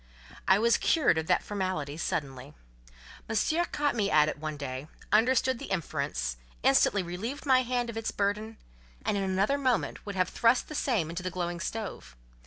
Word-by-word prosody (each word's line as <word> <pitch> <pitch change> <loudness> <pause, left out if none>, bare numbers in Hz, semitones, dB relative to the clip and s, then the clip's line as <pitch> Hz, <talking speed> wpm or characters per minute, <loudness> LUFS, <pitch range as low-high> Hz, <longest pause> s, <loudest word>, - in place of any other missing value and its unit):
I 190 - +6
was 230 +2 +4
cured 285 - +3
of 160 - -4
that - - +2
formality 185 -8 -3
suddenly. 140 -3 -4 0.7
Monsieur 310 +10 +1
caught 295 -3 0
me 205 -3 +1
at 150 -4 +5
it 150 - -5
one 155 -1 -4
day, 135 0 -5 0.2
understood 255 +3 +3
the - - -7
inference, 140 - -2 0.3
instantly 190 +8 +4
relieved 215 - -5
my 260 -2 +5
hand 245 -1 -1
of 230 -1 -6
its 225 - -2
burden, 210 +2 -2 0.5
and, - - +1
in 200 - 0
another 195 +9 +1
moment, 255 -3 0
would 200 - -4
have 185 -1 +1
thrust 235 +2 +2
the - - -6
same 220 - 0
into 170 +2 -4
the 185 - -3
glowing 175 -1 -3
stove. 195 - -5
195 Hz, 180 wpm, -29 LUFS, 160-235 Hz, 0.7 s, I